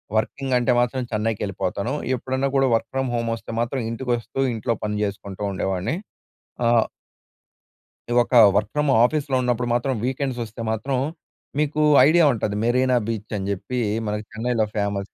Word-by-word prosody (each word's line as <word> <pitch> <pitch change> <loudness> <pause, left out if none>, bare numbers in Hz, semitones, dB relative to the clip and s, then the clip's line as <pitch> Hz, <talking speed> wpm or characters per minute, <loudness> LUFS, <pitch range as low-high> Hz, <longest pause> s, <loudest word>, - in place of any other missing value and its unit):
Working 130 +5 -1
అంటే 125 +1 +2
మాత్రం 125 +2 0
చెన్నైకెళ్ళిపోతాను. 105 +1 -2 0.2
ఎప్పుడన్నా 130 +2 -1
కూడా 135 -1 +4
వర్క్ 115 - -2
ఫ్రమ్ 135 -1 -1
హోమ్ 115 -1 -1
వస్తే 115 - -9
మాత్రం 120 +2 -1
ఇంటికి 120 +2 -3
వస్తూ, 115 +2 -6
ఇంట్లో 115 +1 -1
పని 105 0 -1
జేసుకుంటూ 100 -1 -5
ఉండేవాడిని. 95 - -1 0.7
ఆహ్ 115 -1 +4 1.2
ఇది 120 - 0
ఒక 125 - -2 0.2
వర్క్ 105 0 +1
ఫ్రమ్ 150 -1 +1
ఆఫీస్‌లో 140 0 +1
ఉన్నప్పుడు 125 -1 0
మాత్రం 130 +2 +1
వీకెండ్స్ 130 -1 -2
వస్తే 115 +1 -9
మాత్రం 130 +4 -1 0.6
మీకు 150 0 0 0.3
ఐడియా 170 +1 +5
ఉంటది. 105 -2 -2
మెరీనా 125 +1 +3
బీచ్, 110 -2 -4
అని 95 0 -4
జెప్పి 120 +6 -3 0.3
మనకి 105 +1 -3
చెన్నైలో 115 0 0
ఫేమస్. 100 -1 -2
120 Hz, 150 wpm, -23 LUFS, 105-130 Hz, 1.2 s, ఐడియా